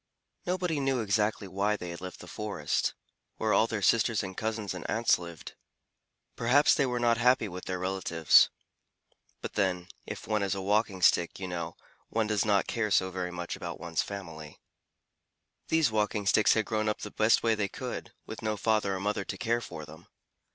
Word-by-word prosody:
Nobody 180 -4 0
knew 135 -2 +1
exactly 105 -1 0
why 100 +3 0
they 90 -4 -6
had 85 - -8
left 90 0 -8
the 90 - -11
forest, 105 +2 -2 0.4
where - - +1
all - - +4
their - - -3
sisters - - +3
and 95 0 -6
cousins 110 -3 -3
and 90 -3 -6
aunts 115 -3 +3
lived. 85 -2 -9 0.8
Perhaps 130 +5 +4
they 140 -7 +2
were 125 -1 -1
not 120 -1 +2
happy 125 -2 +4
with 90 -1 -8
their 95 - -2
relatives. 90 -4 +4 0.9
But - - -6
then, 90 -3 0 0.2
if - - -6
one 110 -1 +1
is 100 0 0
a - - -4
Walking 100 -2 +1
Stick, 85 +1 +3
you 95 - -4
know, 85 -2 -4 0.3
one 115 -1 0
does 105 -1 +1
not 100 -2 +3
care 115 -3 -1
so 95 -1 +2
very 90 -1 -3
much 85 -1 -5
about - - -6
one's 80 -2 -1
family. 80 -7 -8 1.1
These 160 -7 +3
Walking 105 -1 0
Sticks 105 +1 +4
had 110 -1 +1
grown 110 -1 0
up 105 - -3
the 105 - -6
best 110 +1 +3
way 115 -1 +3
they 105 -2 -1
could, - - -6
with - - -8
no 110 -1 -1
father 105 -2 +1
or - - -4
mother 100 +1 -1
to - - -6
care 120 0 0
for 75 -8 -7
them. 80 +3 -14
105 Hz, 195 wpm, -29 LUFS, 90-110 Hz, 1.1 s, all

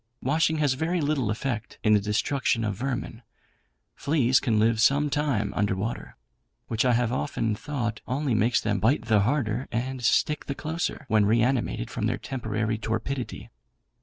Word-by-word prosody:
Washing 160 +4 +2
has 145 -3 +2
very 160 +6 -1
little 145 -7 0
effect 115 +1 -3
in 110 - +4
the 105 - +5
destruction 115 +4 0
of 105 -1 -1
vermin. 125 0 -4 0.7
Fleas 135 -4 +2
can 115 -5 0
live 110 +1 +3
some 145 +4 +3
time 125 -9 0
under 100 -1 +1
water; 110 +5 -5 0.5
which 110 -1 +1
I 125 - +4
have 120 0 +1
often 115 -5 -1
thought 115 -2 -3
only 135 0 -1
makes 115 +3 +3
them 105 -2 -1
bite 115 +4 +2
the 110 -2 +3
harder 120 +1 0
and 125 +2 -3
stick 150 +6 +2
the 140 - -3
closer, 160 0 -3
when 110 -4 +3
reanimated 115 - +1
from - - -1
their - - -1
temporary 110 -3 -3
torpidity. 120 +4 -4
120 Hz, 165 wpm, -26 LUFS, 110-140 Hz, 0.7 s, the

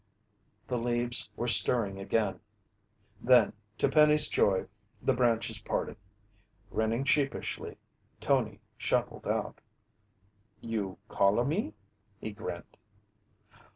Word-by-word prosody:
The 125 - -2
leaves 120 0 -1
were 120 - -3
stirring 105 -3 +5
again. 100 +1 -1 0.8
Then, 120 -4 +5 0.2
to - - +2
Penny's 150 -1 +4
joy, 95 -2 +2 0.3
the 135 - +1
branches 115 -2 0
parted. - - -3 0.8
Grinning 110 +3 0
sheepishly, 140 0 -1 0.4
Tony 110 -7 0 0.2
shuffled - - -1
out. - - -2 1.0
"You 105 -5 -4
call 100 -1 +2
a 120 - +2
me?" 145 - -2 0.4
he 110 - -5
grinned. 100 -4 -8
115 Hz, 100 wpm, -30 LUFS, 105-125 Hz, 1.0 s, stirring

